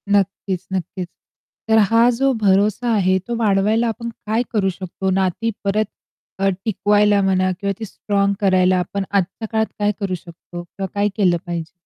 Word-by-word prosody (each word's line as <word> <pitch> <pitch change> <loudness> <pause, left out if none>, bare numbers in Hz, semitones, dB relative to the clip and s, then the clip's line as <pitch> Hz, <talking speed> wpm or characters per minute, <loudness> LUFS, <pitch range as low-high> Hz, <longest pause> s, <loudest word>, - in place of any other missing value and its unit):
नक्कीच, 190 -1 -1
नक्कीच. 180 0 -3 0.6
तर 220 0 +4
हा 230 +2 +5
जो 270 0 +3
भरोसा 205 +4 +2
आहे 190 -2 +3
तो 240 - -2
वाढवायला 215 +2 +2
आपण 235 +1 -4
काय 225 +1 -2
करू 195 -3 +2
शकतो? 190 +1 -4
नाती 190 +4 0
परत 210 +2 +1 0.5
अ, 195 - +2 0.2
टिकवायला 205 -1 +3
म्हणा 185 -1 +2
किंवा 200 -1 -1
ती 220 - -4
स्ट्राँग 200 0 0
करायला 185 -1 +3
आपण 195 +3 -2
आजच्या 200 +3 -1
काळात 220 0 +2
काय 205 0 +2
करू 190 -2 -1
शकतो 175 +1 -10
किंवा 190 +2 -6
काय 205 +1 +2
केलं 180 -5 +3
पाहिजे? 170 -2 -4
200 Hz, 160 wpm, -20 LUFS, 185-215 Hz, 0.6 s, हा